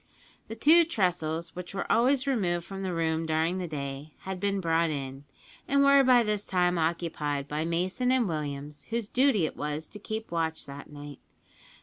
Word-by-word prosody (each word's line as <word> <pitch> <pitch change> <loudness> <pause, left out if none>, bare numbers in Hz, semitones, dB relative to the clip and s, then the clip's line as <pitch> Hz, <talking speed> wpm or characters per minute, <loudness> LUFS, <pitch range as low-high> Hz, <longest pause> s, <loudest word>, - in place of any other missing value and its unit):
The 225 - -6
two 315 +9 +6
tressels, 170 - -1
which 180 +1 -7
were - - -2
always 260 +4 +3
removed 180 -10 0
from 195 -1 -7
the 190 -1 -2
room 165 -1 -1
during 160 +3 +1
the 180 - -3
day, 140 0 -6
had 190 -1 -5
been 200 +1 0
brought 165 -2 +2
in, 135 -1 -5 0.4
and 280 0 +3
were 280 0 +6
by 250 -2 +5
this 210 -2 -1
time 180 -2 +1
occupied 160 -4 -1
by 150 +2 -2
Mason 185 +9 0
and 255 -4 +3
Williams, 145 -2 -4
whose 230 -2 -2
duty 250 - +3
it - - -4
was 150 +2 -4
to 210 - -10
keep 220 0 -5
watch 160 -1 -2
that 140 0 -10
night. 145 -1 -9
175 Hz, 185 wpm, -28 LUFS, 155-215 Hz, 0.4 s, two